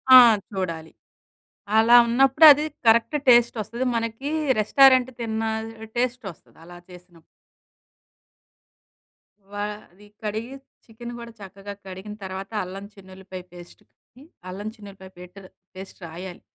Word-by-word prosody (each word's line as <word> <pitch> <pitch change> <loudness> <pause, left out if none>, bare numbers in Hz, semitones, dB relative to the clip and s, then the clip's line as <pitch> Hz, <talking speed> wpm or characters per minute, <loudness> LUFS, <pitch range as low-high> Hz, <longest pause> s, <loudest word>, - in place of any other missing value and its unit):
ఆ! - - +12 0.3
చూడాలి. 165 -5 -5 0.9
అలా 230 +2 +5
ఉన్నప్పుడు 270 +6 +4
అది 295 +2 +2 0.2
కరెక్ట్ 235 +6 +3
టేస్ట్ 240 0 +5
ఒస్తది. 235 +5 -5
మనకి 230 +5 -4 0.3
రెస్టారెంట్ 260 +3 +4
తిన్న 225 -1 -3 0.5
టేస్ట్ 250 -1 -2
ఒస్తది. - - -28
అలా 175 +1 -13
చేసినప్పుడు. 180 -2 -17 2.3
వ - - -16 0.4
అది 205 +3 -20 0.2
కడిగి, 220 +5 -5 0.3
చికెన్ 235 +1 -10
కూడా 235 0 -10
చక్కగా 195 +1 -10
కడిగిన 190 +3 -9
తర్వాత 190 +1 -7
అల్లం 195 +2 -9
చిన్ను‌ల్లిపాయ 190 -1 -11
పేస్టేసి, 175 +8 -18 0.3
అల్లం 200 +3 -7
చిన్ను‌ల్లిపాయ 200 -3 -13
పెటర్ 185 +2 -13 0.3
పేస్ట్ 190 +1 -11
రాయాలి. 175 +2 -10
205 Hz, 110 wpm, -23 LUFS, 185-235 Hz, 2.3 s, ఆ